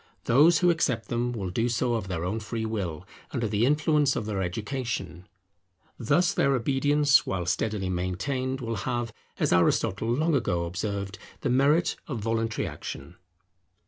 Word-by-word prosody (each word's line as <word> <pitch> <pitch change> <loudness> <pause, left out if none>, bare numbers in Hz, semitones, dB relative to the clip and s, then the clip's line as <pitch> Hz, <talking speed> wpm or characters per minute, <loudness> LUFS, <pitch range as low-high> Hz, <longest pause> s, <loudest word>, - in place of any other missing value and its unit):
Those 150 +7 +5
who 175 +1 +4
accept 130 -9 -1
them 120 +1 0
will 100 -6 -4
do 115 +6 0
so 120 +1 0
of 110 -5 -2
their 90 -2 -3
own 105 +5 -2
free 110 +1 -4
will, 90 -6 -3 0.2
under 120 -4 -2
the 105 +3 +2
influence 150 -1 +2
of 105 - -2
their 105 -3 -2
education. 100 - -4 0.7
Thus 170 +10 +2
their 140 0 +2
obedience, 145 +3 +3
while 90 -2 -2
steadily 100 +2 -1
maintained, 130 +10 -2
will 115 -2 -3
have, 115 +3 -2 0.2
as - - +1
Aristotle 95 +5 +2
long 155 +7 +1
ago 100 -11 +1
observed, 100 +2 -4 0.2
the 135 - 0
merit 145 +6 +3
of 135 - -3
voluntary 115 0 -1
action. - - -7
115 Hz, 155 wpm, -27 LUFS, 100-135 Hz, 0.7 s, Those